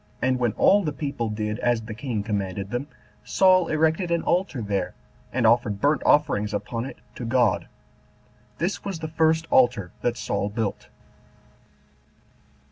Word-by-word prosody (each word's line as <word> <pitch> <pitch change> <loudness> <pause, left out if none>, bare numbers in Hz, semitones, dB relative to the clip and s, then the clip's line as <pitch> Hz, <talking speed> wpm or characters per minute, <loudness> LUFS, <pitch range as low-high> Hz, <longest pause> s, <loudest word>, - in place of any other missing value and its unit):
And 130 0 +1
when 120 -4 +1
all 200 +1 +4
the 155 - -1
people 140 -6 -3
did 105 0 -3
as 120 -2 +1
the 110 0 -7
king 110 -2 -3
commanded 100 -2 -3
them, 125 +4 -3 0.4
Saul 185 -2 +4
erected 160 +3 +1
an 170 -1 0
altar 175 -6 0
there, 100 -4 -2 0.4
and 120 -2 0
offered 110 -3 +3
burnt 145 +3 +2
offerings 105 -8 +3
upon 115 +3 -3
it - - -8 0.2
to - - -7
God 120 -3 +2
14 - - -26 0.9
This 180 +4 -2
was 195 -3 -4
the 160 0 -5
first 160 0 +2
altar 120 -8 +3
that 120 0 0
Saul 100 - -2
built. 110 -1 -3
120 Hz, 155 wpm, -25 LUFS, 105-155 Hz, 0.9 s, all